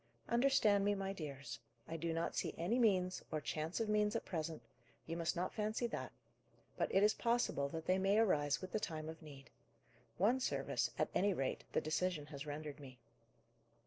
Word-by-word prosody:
Understand 235 -5 +4
me, 205 0 +3
my 195 0 -2
dears: 140 -8 -6 0.3
I 165 - -4
do 165 +1 -1
not 165 +1 -1
see - - -1
any 190 +9 +1
means, 185 -5 +3
or 155 - 0
chance 155 +3 -2
of 225 - 0
means, 210 0 +2
at 230 - -1
present: 160 -2 -3 0.4
you 165 - -3
must 170 -1 0
not 180 +2 -1
fancy 215 +2 -1
that; 235 - -3 0.6
but - - 0
it 195 - +4
is 210 +1 +6
possible 230 -12 +1
that 160 +2 -5
they 185 +1 +3
may 195 +2 +3
arise 150 -10 +3
with 185 -1 -6
the 215 - 0
time 155 -5 -4
of 160 0 -7
need. 140 -4 -12 0.7
One 230 +8 +4
service, 260 - 0
at - - +1
any 200 0 +3
rate, 135 -3 -2
the - - +2
decision 155 0 0
has 140 +1 -6
rendered 150 0 -5
me." 130 -3 -11
180 Hz, 190 wpm, -38 LUFS, 155-210 Hz, 0.7 s, is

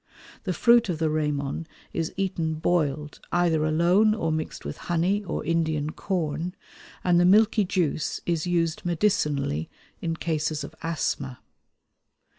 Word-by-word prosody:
The 185 - 0
fruit 235 +4 +5
of 170 - -1
the 160 -1 +1
ramon 150 0 -1 0.3
is 165 -1 -1
eaten 175 -5 -1
boiled 150 -3 0
either 170 -3 +2
alone 175 +7 +4
or 165 -7 -1
mixed 155 0 -4
with - - -5
honey 180 +5 +1
or 180 - -4
Indian 160 -3 0
corn, 170 -1 -2 0.5
and 175 -1 +4
the - - +5
milky 210 +3 +5
juice 170 -5 0
is 170 -1 0
used 170 -1 0
medicinally 150 - 0 0.3
in 165 -1 -1
cases 155 -2 -1
of - - -8
asthma. 145 -5 -2
165 Hz, 135 wpm, -26 LUFS, 155-180 Hz, 0.5 s, fruit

